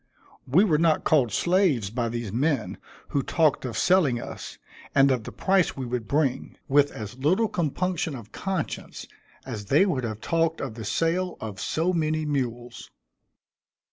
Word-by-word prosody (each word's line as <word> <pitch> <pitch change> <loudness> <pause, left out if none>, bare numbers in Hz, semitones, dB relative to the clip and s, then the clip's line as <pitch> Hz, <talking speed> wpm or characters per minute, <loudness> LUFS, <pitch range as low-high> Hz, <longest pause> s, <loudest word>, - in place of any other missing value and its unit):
We 155 +10 +5
were 160 -8 +2
not 160 -2 +3
called 135 -8 +3
slaves 170 - +2
by 120 0 -1
these 120 -3 -4
men, 135 -1 0 0.3
who 140 - +1
talked 155 -2 +1
of 115 -4 -4
selling 155 -6 +3
us, - - -8 0.4
and 135 0 +6
of 120 -4 -1
the - - -6
price 190 -5 +1
we 130 - -3
would 120 -2 -3
bring, 140 -3 -1
with 145 +1 +4
as 110 +3 -8
little 185 +11 +2
compunction 170 -2 -1
of 115 -4 -10
conscience 190 -5 -4 0.4
as 110 -6 -6
they 145 - +4
would 145 -10 -1
have 110 -2 -4
talked 165 +5 0
of 135 -5 -4
the 110 -1 -7
sale 170 - 0
of 105 -4 -6
so 170 +3 0
many 155 -2 0
mules. 120 -4 -3
140 Hz, 165 wpm, -26 LUFS, 120-165 Hz, 0.4 s, and